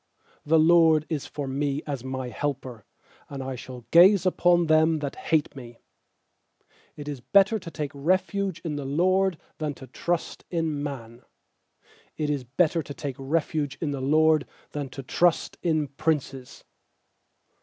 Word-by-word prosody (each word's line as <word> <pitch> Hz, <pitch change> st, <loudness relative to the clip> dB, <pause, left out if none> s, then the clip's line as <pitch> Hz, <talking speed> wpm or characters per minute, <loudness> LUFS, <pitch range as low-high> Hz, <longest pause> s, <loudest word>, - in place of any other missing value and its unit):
7The 160 Hz, +2 st, +5 dB
LORD 165 Hz, -3 st, +5 dB
is 150 Hz, -4 st, -3 dB
for 145 Hz, -2 st, -5 dB
me 140 Hz, +2 st, -2 dB
as 140 Hz, -5 st, -4 dB
my 130 Hz, -1 st, -4 dB
helper; 130 Hz, -4 st, -4 dB, 0.4 s
And 140 Hz, -2 st, -6 dB
I 130 Hz, 0 st, -4 dB
shall 125 Hz, -1 st, -9 dB
gaze 190 Hz, +3 st, +7 dB
upon 175 Hz, -1 st, +3 dB
them 160 Hz, 0 st, +4 dB
that 145 Hz, -2 st, -4 dB
hate 155 Hz, -3 st, 0 dB
me. 120 Hz, -3 st, -10 dB, 1.2 s
8It 145 Hz, -1 st, -8 dB
is 145 Hz, -4 st, -5 dB
better 200 Hz, -, +4 dB
to 175 Hz, -, -9 dB
take 150 Hz, -3 st, -4 dB
refuge 185 Hz, +4 st, 0 dB
in 150 Hz, -3 st, -2 dB
the 145 Hz, -, -4 dB
LORD 185 Hz, +5 st, +2 dB, 0.2 s
Than 150 Hz, -2 st, -2 dB
to 130 Hz, -, -11 dB
trust 170 Hz, +7 st, -3 dB
in 160 Hz, -4 st, -1 dB
man. 120 Hz, -5 st, -6 dB, 1.0 s
9It 150 Hz, -1 st, -1 dB
is 140 Hz, -3 st, -2 dB
better 160 Hz, +6 st, +1 dB
to 145 Hz, -2 st, -9 dB
take 135 Hz, 0 st, -5 dB
refuge 145 Hz, 0 st, -1 dB
in 155 Hz, -4 st, -2 dB
the 140 Hz, -2 st, -4 dB
LORD 155 Hz, +2 st, +3 dB, 0.2 s
Than 145 Hz, -2 st, -4 dB
to 135 Hz, +1 st, -8 dB
trust 175 Hz, +6 st, +1 dB
in 155 Hz, -3 st, +1 dB
princes. 140 Hz, -3 st, -3 dB
150 Hz, 155 wpm, -26 LUFS, 135-165 Hz, 1.2 s, gaze